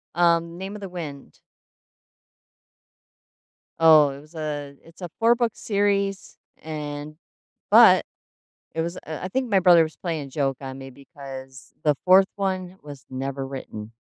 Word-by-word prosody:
Um, 170 -1 +2
Name 190 +2 -6
of 210 - -9
the 195 - -6
Wind. 155 -6 -8 2.4
Oh, 155 -3 +7
it 135 0 -8
was 155 +3 -19
a 145 -2 -5
it's 165 +3 -18
a 175 - -5
4 235 +1 +5
book 235 -1 0
series 200 -1 -1 0.2
and 150 -1 -6 0.6
but - - +7 0.7
it 160 - -1
was, 170 +2 -3
uh - - -6
uh, 155 -1 -5
I - - -2
think 255 +3 -2
my 195 - +4
brother 175 -2 +6
was 155 0 -6
playing 160 -5 -4
a - - -13
joke 135 -1 -1
on 130 -1 -7
me 135 0 -9
because 135 -1 -11
the 150 -1 +3
4th 190 +1 +6
one 185 -2 -3
was 145 -2 -11
never 135 +1 -4
written. 115 -5 -8
160 Hz, 160 wpm, -24 LUFS, 140-185 Hz, 2.4 s, Oh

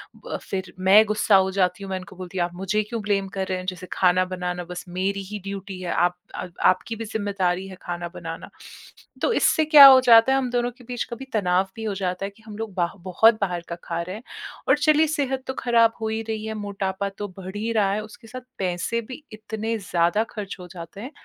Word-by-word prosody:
ब - - -16
अ, - - -1
फिर 190 -2 -5
मैं 190 +3 +7
गुस्सा 210 0 +3
हो 190 0 +4
जाती 185 0 0
हूँ। 195 - -7
मैं 190 - -1
उनको 190 +1 -12
बोलती 185 0 -7
हूँ, 175 - +3
"आप 175 - -8
मुझे 195 +3 0
क्यों 225 +2 -5
ब्लेम 200 -1 0
कर 190 - -1
रहे 185 - -1
हैं? 185 - -7
जैसे 185 0 -10
खाना 185 0 +3
बनाना 180 0 -3
बस 180 -1 -6
मेरी 190 +3 -1
ही 210 - -4
ड्यूटी 195 -1 -6
है। 175 - -3
आप 175 +1 +1 0.2
अ, - - -5 0.2
आपकी 185 +5 +2
भी 225 0 -6
ज़िम्मेदारी 195 -3 -1
है 185 - -10
खाना 175 0 -4
बनाना।" 165 -1 -7 0.7
तो 485 - +2
इससे 315 -7 +3
क्या 300 -2 +10
हो 260 -1 +9
जाता 235 +1 +7
है, 270 - +3
हम 255 -2 -2
दोनों 245 0 0
के 255 - -15
बीच 245 0 -3
कभी 250 +3 -6
तनाव 190 -2 +2
भी 225 - -7
हो 210 - -1
जाता 185 0 -2
है - - -4
कि 220 +2 -23
हम 210 -1 -8
लोग 220 -2 -5
बाह 175 -2 0 0.2
बहुत 225 +5 +5
बाहर 180 -3 -1
का 170 - -3
खा 170 0 -2
रहे 180 +3 -5
हैं। 220 - -10 0.5
और - - +6
चलिए, 310 +1 +4
सेहत 270 -4 -1
तो 265 - -2
खराब 230 -2 +4
हो - - 0
ही 220 0 -2
रही 220 -1 -3
है, 220 - -3
मोटापा 200 -2 -3
तो 205 - -4
बढ़ 190 +1 -8
ही 225 +2 -2
रहा 205 -3 +2
है, 215 - -1
उसके 220 +2 -13
साथ 255 +3 -8 0.2
पैसे 185 +5 -1
भी 255 +6 -10
इतने 220 +1 -4
ज़्यादा 175 +2 +1
ख़र्च 205 -2 -5
हो 180 - -9
जाते 175 +2 -9
हैं 255 +6 -7
200 Hz, 245 wpm, -24 LUFS, 185-225 Hz, 0.7 s, क्या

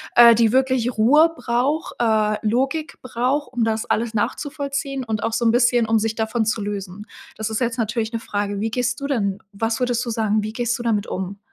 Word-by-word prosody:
äh, 235 -1 +9
die 225 -1 +3
wirklich 255 -2 +1
Ruhe 300 +9 +5
braucht, 270 +5 -1
äh, 215 -2 +2
Logik 270 +7 -1
braucht, 255 +4 -1
um 245 -2 0
das 225 +1 0
alles 230 +1 -1
nachzuvollziehen 275 +3 -3
und 220 -3 -3
auch 225 0 -1
so 235 - 0
'n 225 - +5
bisschen, 240 -1 +3
um 225 - +3
sich 220 0 0
davon 220 +1 -1
zu 220 0 -1
lösen? 200 0 -6 0.3
Das 220 0 -3
ist 220 - -2
jetzt 240 -1 -1
natürlich 225 0 -1
'ne 230 - -1
Frage. 205 -2 -3
Wie 220 +2 -1
gehst 245 +2 -2
du 280 - -2
denn 200 -8 -1
was 225 +2 -2
würdest 245 -1 0
du 235 - -3
sagen, 215 -1 0
wie 215 - -5
gehst 240 +1 -1
du 240 - -6
damit 215 -4 0
um? 190 +2 -5
230 Hz, 215 wpm, -21 LUFS, 220-250 Hz, 0.3 s, äh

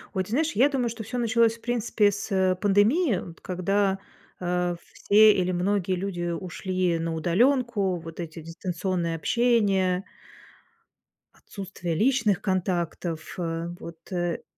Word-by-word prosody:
Ой, 190 - +1
ты - - -13
знаешь, 310 +8 +1
я 275 +4 +4
думаю, 250 -4 0
что 225 -1 -6
всё 245 +4 -5
началось, 230 -1 +2
в - - -26
принципе, 230 -3 +1
с, 200 0 -6
э, 190 -1 +2
пандемии, 205 - +3
вот 170 -1 -9
когда, 195 +2 0 0.4
а, 180 -1 0 0.2
все, 215 +1 +6
или 185 -1 0
многие 185 +1 0
люди 175 -2 -3
ушли 185 -1 -2
на 165 0 -2
удаленку. 205 - +2
Вот 165 +1 -10
эти 165 -1 -6
дистанционное 170 +1 -3
общение 195 -2 +2 1.4
отсутствие 185 -4 -5
личных 220 -3 +2
контактов. 175 -3 -1 0.2
Э, 165 0 -3
вот 165 +1 -11
э 175 -2 -2
190 Hz, 135 wpm, -26 LUFS, 175-215 Hz, 1.4 s, все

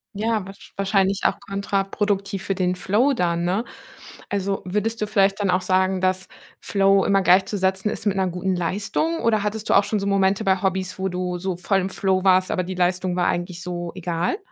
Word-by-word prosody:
Ja, 220 -1 -1
wahrsch 195 +1 -13
wahrscheinlich 195 0 +1
auch - - +2
kontraproduktiv 195 0 -2
für 195 - -1
den 180 -1 0
Flow 210 +10 +2
dann, 170 -6 0
ne? 195 +7 0 0.6
Also, 200 -1 -1
würdest 210 +5 -2
du 210 - 0
vielleicht 200 -1 +2
dann 200 -2 0
auch 180 +1 +2
sagen, 185 0 +1
dass 185 0 0 0.3
Flow 195 -1 +3
immer 195 -1 +2
gleichzusetzen 190 +1 +2
ist - - -5
mit 200 -2 +1
'ner 190 -1 +1
guten 180 +1 -2
Leistung? 205 - -1
Oder 220 -2 +2
hattest 210 +1 -3
du - - +4
auch 200 - +6
schon 205 +1 -1
so 200 - -3
Momente 195 +1 +2
bei 190 -2 +2
Hobbys, 190 -1 -2
wo 190 0 -1
du 180 0 -3
so 185 -1 -3
voll 195 +2 +1
im 190 0 -2
Flow 190 -1 0
warst, 185 -1 +4
aber 185 - 0
die 185 +1 -5
Leistung 180 0 0
war 180 - +1
eigentlich 175 0 -2
so 175 -1 -4
egal? 175 - -2
190 Hz, 205 wpm, -23 LUFS, 185-200 Hz, 0.6 s, auch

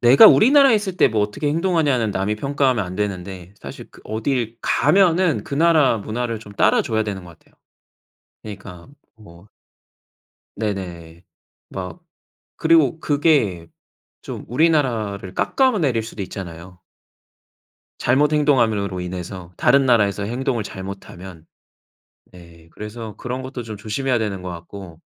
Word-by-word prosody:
내가 120 +3 +8
우리나라에 265 - +6
있을 195 -4 -2
때 - - +5
뭐 110 -2 0
어떻게 105 +8 -2
행동하냐는 150 - +1
남이 100 +2 -1
평가하면 135 -4 0
안 90 0 -7
되는데 95 -2 -5
사실 - - -9
그 - - -17
어딜 115 +1 -2
가면은 175 - +2
그 - - -5
나라 155 -6 +4
문화를 115 +2 -3
좀 105 -2 -12
따라 - - +3
줘야 110 -1 -1
되는 100 -4 -5
것 85 -2 -14
같아요. - - -30 0.9
그니까 95 -4 -10 0.3
뭐 100 -3 -17 1.1
네네. 90 -5 -5 0.5
막 95 - -7 0.6
그리고 160 -2 +3
그게 140 - +1 0.5
좀 - - -8
우리나라를 120 - 0
깎아 260 -4 +1
내릴 125 -8 0
수도 110 -2 -8
있잖아요. 90 -2 -9 1.2
잘못 145 +5 +2
행동함으로 110 -11 +1
인해서, 90 0 -7
다른 135 -1 +3
나라에서 105 -4 +2
행동을 120 +1 -2
잘못하면. 95 -3 -9 0.9
네. 85 -2 -16
그래서 105 0 -8
그런 125 +1 -5
것도 130 -1 -7
좀 110 -2 -8
조심해야 120 +5 -1
되는 100 -4 -3
것 90 - -6
같고. 85 0 -10
110 Hz, 295 characters per minute, -21 LUFS, 95-140 Hz, 1.2 s, 내가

